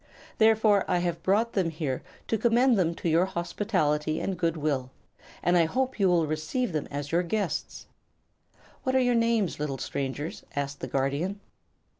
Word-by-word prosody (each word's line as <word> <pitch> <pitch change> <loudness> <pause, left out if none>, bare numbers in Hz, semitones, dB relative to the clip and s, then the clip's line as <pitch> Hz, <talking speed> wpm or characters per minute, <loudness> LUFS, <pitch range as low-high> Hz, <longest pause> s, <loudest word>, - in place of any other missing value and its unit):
Therefore 220 -2 +5
I - - +2
have 175 -1 -1
brought 215 +6 +2
them 185 -4 +1
here 150 -5 -3 0.3
to - - +1
commend 240 +2 +4
them 170 -4 +1
to - - -4
your 165 +3 +4
hospitality 170 -5 -1
and 195 - -2
good 165 -2 0
will, 140 -4 -1 0.5
and 175 - +3
I 170 -2 +5
hope 260 +7 -1
you 195 - +4
will 170 -2 +3
receive 155 - -2
them 155 -2 -2
as 145 0 -5
your 170 +2 +3
guests." 180 -3 -3 1.0
"What 260 -1 -1
are - - +5
your 245 -1 +3
names, 230 -7 +1
little 145 -2 -2
strangers?" 140 +4 -4
asked 140 0 -3
the - - -5
Guardian. 140 +9 -1
175 Hz, 170 wpm, -27 LUFS, 150-215 Hz, 1.0 s, Therefore